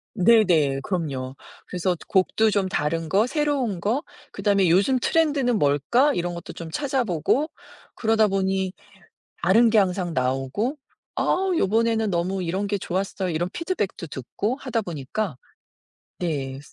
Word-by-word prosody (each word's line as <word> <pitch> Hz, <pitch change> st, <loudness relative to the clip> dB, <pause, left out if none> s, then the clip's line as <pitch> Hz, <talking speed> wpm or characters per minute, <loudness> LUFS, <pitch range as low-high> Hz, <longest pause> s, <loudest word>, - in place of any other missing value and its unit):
네네 175 Hz, -10 st, +4 dB
그럼요. 135 Hz, -8 st, -3 dB, 0.3 s
그래서 180 Hz, 0 st, -1 dB
곡도 210 Hz, +3 st, +3 dB
좀 200 Hz, -2 st, +1 dB
다른 165 Hz, -1 st, -1 dB
거, 205 Hz, +6 st, +3 dB
새로운 275 Hz, -, 0 dB
거, 230 Hz, -, 0 dB, 0.3 s
그다음에 200 Hz, -3 st, +2 dB
'요즘 200 Hz, +10 st, +4 dB
트렌드는 285 Hz, -5 st, +2 dB
뭘까?' 150 Hz, -, +3 dB
이런 175 Hz, 0 st, -2 dB
것도 170 Hz, -, -8 dB
좀 165 Hz, -1 st, -8 dB
찾아보고 265 Hz, -, 0 dB, 0.5 s
그러다 220 Hz, -1 st, +3 dB
보니 190 Hz, -1 st, 0 dB, 0.7 s
다른 225 Hz, +7 st, +5 dB
게 220 Hz, -, +4 dB
항상 185 Hz, -3 st, +1 dB
나오고 135 Hz, -, -1 dB, 0.4 s
"아 385 Hz, +1 st, +1 dB
요번에는 225 Hz, -1 st, +2 dB
너무 185 Hz, +2 st, -1 dB
이런 185 Hz, +4 st, -2 dB
게 200 Hz, 0 st, -1 dB
좋았어요." 190 Hz, 0 st, -2 dB
이런 170 Hz, +2 st, -1 dB
피드백도 330 Hz, -, -3 dB
듣고 200 Hz, -, -3 dB
하다 250 Hz, -5 st, -2 dB
보니까 170 Hz, 0 st, -4 dB, 0.8 s
네. 140 Hz, -6 st, -3 dB
195 Hz, 285 characters per minute, -24 LUFS, 170-230 Hz, 0.8 s, 다른